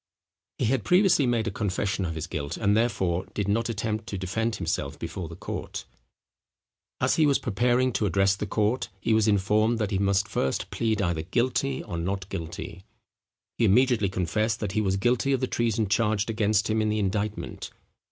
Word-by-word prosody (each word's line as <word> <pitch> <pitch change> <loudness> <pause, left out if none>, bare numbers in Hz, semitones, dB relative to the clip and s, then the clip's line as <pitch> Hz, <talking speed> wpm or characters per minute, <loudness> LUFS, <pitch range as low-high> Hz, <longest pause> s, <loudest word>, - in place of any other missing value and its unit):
He 125 - 0
had 120 0 +1
previously 180 - +4
made 120 -2 +1
a 110 - -1
confession 95 -1 -1
of 80 -1 -3
his 80 0 -3
guilt, 75 -2 -4
and, 105 -1 +2
therefore, 95 -6 0
did 100 -2 -1
not 115 +3 +1
attempt 110 0 -2
to 100 - -4
defend 110 +5 -1
himself - - -3
before 85 -4 -5
the 85 - -8
court. - - -6 1.1
As - - +2
he 155 -2 +5
was 140 - +4
preparing 125 +3 +1
to 105 +1 +1
address 95 +2 +3
the 105 +1 -4
court, 110 +5 0
he 110 - +1
was 110 0 +3
informed 105 +3 +2
that 105 -2 -1
he 95 - +1
must 100 0 +2
first 65 - -2
plead 110 -3 0
either 85 -3 0
guilty 125 +8 0
or 85 - -5
not 95 +2 -3
guilty. 85 +2 -6 0.8
He 115 - +4
immediately 115 -1 +4
confessed 110 +5 -1
that 105 -3 -2
he 110 - +1
was 95 -2 +1
guilty 125 +6 +2
of 135 - +1
the 130 - 0
treason 115 -3 0
charged 105 +1 +1
against 105 -1 +1
him 110 0 +1
in 110 - +1
the 105 - 0
indictment. 105 +1 -2
105 Hz, 190 wpm, -26 LUFS, 95-115 Hz, 1.1 s, he